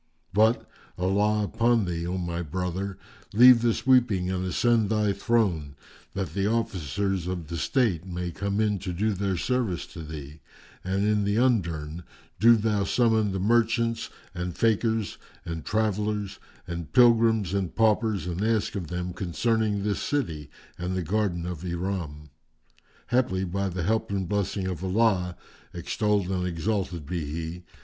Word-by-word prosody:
But, 110 +4 +3 0.3
Allah 105 +3 +2
upon 115 +1 +2
thee, 85 -1 -3
O 90 +1 -2
my 85 -1 -3
brother, 90 +3 -3 0.4
leave 125 +1 +8
this 120 0 0
weeping 110 -9 +3
and 95 -1 -2
ascend 110 +3 +2
thy 105 -2 +2
throne, 90 -12 0 0.4
that 95 -1 -3
the 100 0 0
Officers 95 - -1
of 90 -4 -4
the 85 - -3
State 110 - +1
may 90 -1 -4
come 100 +4 -2
in 105 -2 +1
to 90 -1 -4
do 105 +5 0
their 95 -1 -1
service 120 -5 -1
to 85 - -7
thee, 75 -1 -8 0.4
and 95 +2 0
in 105 -1 +2
the 100 +1 0
undurn, 85 -10 0 0.4
do 115 +3 +7
thou 105 -2 +1
summon 110 -1 +2
the 95 - -2
merchants 115 +2 +1 0.2
and 90 -1 -4
fakirs 110 -1 +1 0.3
and 80 -1 -5
travellers 105 -2 -1 0.3
and 85 -2 -6
pilgrims 115 -5 +4
and 95 -4 -2
paupers 110 -4 +2
and 90 +3 -3
ask 110 -1 +1
of 90 -5 -4
them 90 +1 -4
concerning 105 +2 0
this 105 -1 -1
city 80 - -2 0.3
and 90 +1 -2
the 90 - -1
garden 90 -1 -1
of 90 -2 -5
Iram; 85 -5 -4 0.8
haply 120 -7 +1
by 95 +2 -1
the 90 -1 -3
help 110 +5 0
and 95 -2 -2
blessing 100 0 -1
of 90 -2 -4
Allah 95 -3 +1 0.4
(extolled 100 +2 0
and 90 -1 -1
exalted 90 -2 -2
be 85 0 -3
He!) 80 +4 -5
100 Hz, 155 wpm, -26 LUFS, 90-110 Hz, 0.8 s, leave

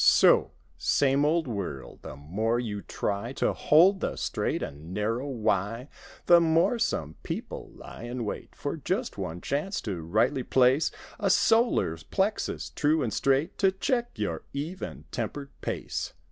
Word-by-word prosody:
So! - - +6 0.3
Same 135 - +3
old 160 0 +2
world! 95 - -5
The - - -8
more 105 - -1
you 105 -4 -3
try 105 +6 -3
To - - +1
hold 185 +6 +5
the - - -2
"straight - - -1
and 75 +6 -7
narrow" 115 +6 -1
why 115 0 -1 0.4
The 175 0 +8
more 165 +9 +3
some 80 - -1
people - - -5
lie 115 - -10
in 120 -1 -4
wait 105 - -6
For 145 +3 -3
just 185 - -2
one 90 -2 -4
chance 150 - -1
to 95 -6 -4
rightly 85 +10 +1
place 130 +4 +3 0.3
A - - +1
solar 225 - +3
plexus, 190 - -2
true 155 0 +2
and 115 - -2
straight. 140 +6 +1
To 195 -1 +4
check 240 +5 -1
your - - -2
even 160 +7 -5
tempered 140 -1 -4
pace. - - -3
135 Hz, 150 wpm, -28 LUFS, 105-165 Hz, 0.4 s, The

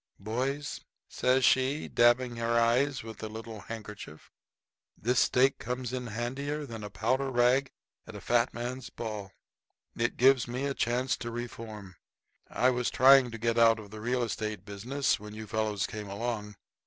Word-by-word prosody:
] - - -43
"Boys," 130 +8 -3 0.3
says 130 +1 +2
she, 130 +3 +2
dabbing 120 0 +3
her 115 0 +1
eyes 125 +4 +2
with 110 -1 -9
a 110 - -3
little 110 0 -8
handkerchief, 105 -6 -9 0.7
"this 125 +3 +1
stake 135 +2 +3
comes 125 0 -4
in 125 -1 -3
handier 135 +7 -3
than 115 -5 -8
a 105 - -5
powder 125 +8 0
rag 125 +2 +3 0.4
at - - -9
a - - -6
fat 120 +1 +2
men's 125 +2 -5
ball. 105 -4 -6 0.6
It 120 +1 -1
gives 130 0 +5
me 125 +3 -3
a 140 - -1
chance 125 +1 0
to 120 - -5
reform. 110 -5 -7 0.5
I 130 - +3
was 125 -1 0
trying 135 0 +6
to 115 - -7
get 115 +1 0
out 115 -1 +6
of 105 -2 -11
the 110 0 -8
real 125 +2 0
estate 110 -2 -4
business 120 +7 -1
when 105 0 -9
you 110 0 -7
fellows 105 -2 -1
came 105 -2 -6
along. 105 0 -4
120 Hz, 170 wpm, -30 LUFS, 110-130 Hz, 0.7 s, trying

